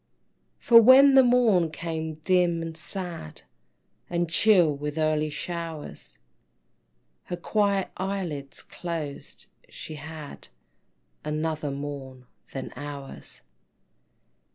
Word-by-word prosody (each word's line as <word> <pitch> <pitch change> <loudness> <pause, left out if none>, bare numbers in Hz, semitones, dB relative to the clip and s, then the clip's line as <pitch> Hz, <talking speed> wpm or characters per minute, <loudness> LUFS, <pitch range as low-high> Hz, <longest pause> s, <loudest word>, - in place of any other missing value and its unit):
For 230 -1 +7
when 265 +4 +8
the 265 - +8
morn 235 -9 +4
came 160 0 -4
dim 175 -2 +2
and 165 -1 -6
sad, 170 - -5 0.7
And 175 0 0
chill 175 -3 +4
with 150 +2 -5
early 155 -1 +1
showers, 165 -1 -6 1.1
Her - - -4
quiet 200 +1 0
eyelids 180 -8 -4
closed 165 -5 -6 0.2
she 155 - -8
had 155 0 -9 0.8
Another 155 0 -2
morn 140 -2 -7 0.3
than 135 - -6
ours. 140 - -8
160 Hz, 95 wpm, -26 LUFS, 150-185 Hz, 1.1 s, when